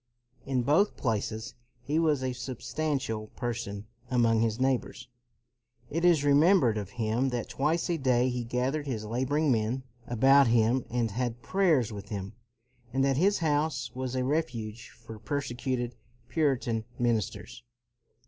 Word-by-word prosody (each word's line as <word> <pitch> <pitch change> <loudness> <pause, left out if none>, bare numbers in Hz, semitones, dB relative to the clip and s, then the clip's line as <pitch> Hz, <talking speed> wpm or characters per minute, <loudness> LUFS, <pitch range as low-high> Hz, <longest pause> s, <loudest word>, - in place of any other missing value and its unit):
In 130 -2 +1
both 155 - +3
places 110 0 -2 0.3
he 150 +5 0
was 150 -5 +2
a 130 -1 -1
substantial 130 -2 -3
person 105 -4 -4 0.2
among 115 -3 +3
his 115 0 0
neighbors. 130 -1 -1 0.8
It 165 +3 -1
is 170 -5 +5
remembered 145 - +5
of 100 -2 -6
him 115 +4 +1
that 120 -2 -3
twice 155 +5 0
a 170 -2 -1
CROMWELL - - -10
239 125 -2 +3
day 125 - -2
he 120 - -2
gathered 130 +5 -1
his 110 -5 -3
laboring 130 +6 +1
men 115 +3 0 0.2
about 135 +3 +5
him 115 +2 +3
and 115 -2 0
had 120 +1 -3
prayers 160 - +2
with 100 -1 -8
them; 100 0 -5 0.6
and 135 +1 +2
that 135 -1 +2
his 195 +6 +3
house 145 -4 0
was 130 0 -4
a 130 - 0
refuge 120 -7 -2
for 115 -2 -12
persecuted 125 -1 -2 0.4
Puritan 125 -6 0
ministers. 110 -3 -1
125 Hz, 150 wpm, -29 LUFS, 115-140 Hz, 0.8 s, is